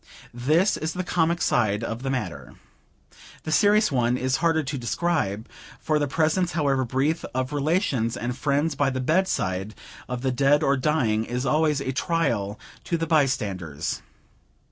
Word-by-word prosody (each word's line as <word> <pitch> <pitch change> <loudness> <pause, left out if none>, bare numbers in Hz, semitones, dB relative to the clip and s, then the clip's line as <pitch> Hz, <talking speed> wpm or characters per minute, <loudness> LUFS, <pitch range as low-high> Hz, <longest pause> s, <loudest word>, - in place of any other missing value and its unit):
This 155 - +2
is 160 +1 -3
the 185 - -3
comic 170 -1 +1
side 110 -2 +1
of 115 +1 -4
the 135 - -3
matter. 130 -2 -4 0.9
The 155 - -4
serious 210 +3 +4
one 125 -2 +1
is 130 +1 0
harder 165 -1 +2
to 140 +1 -4
describe; 120 - -1 0.3
for 155 -1 0
the 145 - 0
presence, 160 +5 +1
however 140 -4 +1
brief, 135 +6 0
of 130 +2 -1
relations 145 - 0
and 120 +1 -3
friends 145 +3 0
by 140 0 +1
the 130 -1 -3
bedside 115 - 0 0.3
of 125 0 -4
the 130 - +1
dead 140 +4 +3
or 140 -1 +3
dying, 130 -6 +1
is 125 +3 -3
always 150 -1 +2
a 130 - -2
trial 125 -9 -1 0.3
to 170 - 0
the 165 - -1
bystanders. 105 - -1
140 Hz, 160 wpm, -25 LUFS, 120-160 Hz, 0.9 s, serious